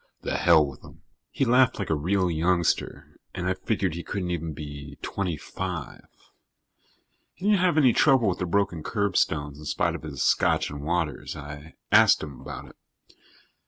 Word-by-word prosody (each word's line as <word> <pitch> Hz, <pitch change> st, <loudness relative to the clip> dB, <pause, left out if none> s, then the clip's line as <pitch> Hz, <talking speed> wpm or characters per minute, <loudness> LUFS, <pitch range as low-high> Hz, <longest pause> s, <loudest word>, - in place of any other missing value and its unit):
The -, -, -3 dB
hell 80 Hz, -3 st, +5 dB
with 70 Hz, -1 st, -9 dB
them." -, -, -16 dB, 0.3 s
He 135 Hz, -, 0 dB
laughed 125 Hz, +1 st, +4 dB
like 100 Hz, -6 st, -3 dB
a -, -, +3 dB
real 90 Hz, +4 st, +1 dB
youngster 85 Hz, +1 st, 0 dB, 0.2 s
and 90 Hz, -1 st, -3 dB
I 90 Hz, -, +2 dB
figured 95 Hz, -2 st, -1 dB
he 85 Hz, -, -5 dB
couldn't 90 Hz, -1 st, -4 dB
even 85 Hz, -2 st, -3 dB
be 70 Hz, -2 st, -8 dB
twenty 90 Hz, -5 st, -2 dB
five. 90 Hz, -1 st, -6 dB, 1.3 s
He 185 Hz, -, -8 dB
didn't 205 Hz, -1 st, +4 dB
have 180 Hz, -3 st, +2 dB
any 130 Hz, -6 st, +5 dB
trouble 135 Hz, -6 st, +4 dB
with 90 Hz, -, 0 dB
the 90 Hz, -, -2 dB
broken 100 Hz, -2 st, 0 dB
curbstones 80 Hz, -7 st, -1 dB
in 75 Hz, -, -10 dB
spite -, -, 0 dB
of -, -, -6 dB
his 70 Hz, -4 st, -4 dB
scotch -, -, +2 dB
and 75 Hz, -1 st, -6 dB
waters. 80 Hz, 0 st, -2 dB
I 75 Hz, +2 st, -9 dB, 0.2 s
asked -, -, +6 dB
him 75 Hz, -4 st, -8 dB
about -, -, -8 dB
it. -, -, -19 dB
85 Hz, 175 wpm, -26 LUFS, 75-100 Hz, 1.3 s, asked